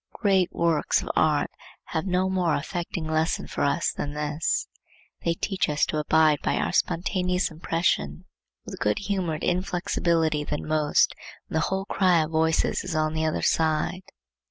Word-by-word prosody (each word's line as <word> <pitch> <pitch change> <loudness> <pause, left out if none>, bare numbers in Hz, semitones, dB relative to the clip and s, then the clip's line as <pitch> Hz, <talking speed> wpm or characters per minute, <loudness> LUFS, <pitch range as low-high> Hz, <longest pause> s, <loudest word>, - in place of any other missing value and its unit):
Great 195 -4 +2
works 165 -3 +1
of - - -3
art 150 -2 +2 0.3
have 160 +3 -3
no 185 0 +1
more 180 -4 +1
affecting 170 +1 -4
lesson 160 +1 0
for - - -3
us 145 +4 +1
than 145 - -4
this. 150 +2 -1 0.6
They 170 0 +1
teach 190 -1 -1
us 150 0 +2
to 155 - -2
abide 155 -1 +3
by - - 0
our - - 0
spontaneous 180 +1 0
impression 160 - -1 0.4
with - - -8
good 105 0 +1
humored 185 -6 -2
inflexibility 170 -4 0
then 150 0 -4
most 155 -1 +2 0.4
when - - -1
the 160 - +1
whole 190 0 -2
cry 180 -5 +3
of 155 - -6
voices 160 0 +1
is 180 -3 -4
on 155 0 +1
the 160 0 -1
other 155 - -1
side. 160 +3 +1
160 Hz, 160 wpm, -25 LUFS, 155-180 Hz, 0.6 s, abide